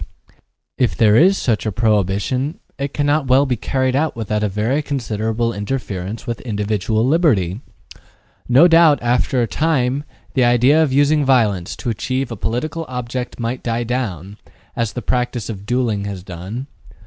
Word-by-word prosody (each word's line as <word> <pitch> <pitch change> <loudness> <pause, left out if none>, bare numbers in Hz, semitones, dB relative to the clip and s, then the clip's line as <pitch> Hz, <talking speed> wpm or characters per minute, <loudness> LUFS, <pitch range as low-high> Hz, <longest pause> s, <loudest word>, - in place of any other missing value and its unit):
Yet, - - -30 0.4
if 125 - +1
there 105 -2 +5
is 190 +9 +5
such 110 -5 0
a 110 - -1
prohibition, 110 - 0 0.2
it 140 0 -2
cannot 145 0 0
well 130 +2 +4
be 130 -3 0
carried 130 +1 -1
out 155 +2 0
without 105 -2 -2
a 105 - 0
very 110 +9 0
considerable 115 -4 -2
interference 105 -2 -4
with 120 -1 -4
individual 110 0 -1
liberty. 120 - +2 0.9
No 135 +8 +7
doubt, 165 -3 +6
after 125 +1 +1
a - - -1
time, 140 -2 0 0.3
the 130 - +2
idea 120 +6 +4
of 155 -4 +2
using 145 +2 +3
violence 110 -8 +1
to 120 - -3
achieve 130 +3 -2
a - - -3
political 140 +10 -3
object 125 0 -5
might 120 +2 -3
die 120 0 -1
down, 105 -6 -4 0.4
as 115 -3 -1
the 125 - -5
practice 125 0 -1
of 100 -2 -7
duelling 120 -5 0
has 100 -3 -6
done. 95 +7 -7
120 Hz, 160 wpm, -19 LUFS, 105-135 Hz, 0.9 s, No